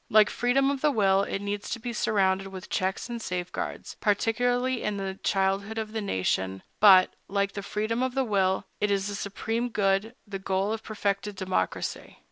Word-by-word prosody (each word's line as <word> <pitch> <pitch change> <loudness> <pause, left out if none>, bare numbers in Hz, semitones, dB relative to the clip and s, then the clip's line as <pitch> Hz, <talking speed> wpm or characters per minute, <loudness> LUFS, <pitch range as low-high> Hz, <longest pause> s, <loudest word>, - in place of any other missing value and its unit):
Like 215 0 +6
freedom 270 +3 +2
of 275 -1 -3
the 300 - +4
will, 195 -7 +3
it 200 0 -3
needs 205 0 -3
to 235 - -3
be 240 +1 -4
surrounded 195 -3 +1
with 190 -1 -9
checks 190 +4 -1
and 235 -1 -5
safeguards, 180 -3 -4
particularly 245 +4 +1
in 210 -1 -1
the 195 -1 -4
childhood 195 +3 0
of 220 -1 -3
the 220 0 -2
nation; 95 - -1 0.2
but, 190 -3 +7
like 200 0 0
freedom 215 +4 -2
of 260 0 -1
the 265 -1 +2
will, 190 -3 +1
it 210 - +1
is 195 -1 +1
the - - -4
supreme 225 +4 -2
good, 205 +1 +1
the 200 -2 -5
goal 190 +2 0
of 225 - -4
perfected 205 -1 -2
democracy. 185 0 -2
205 Hz, 180 wpm, -27 LUFS, 195-225 Hz, 0.2 s, but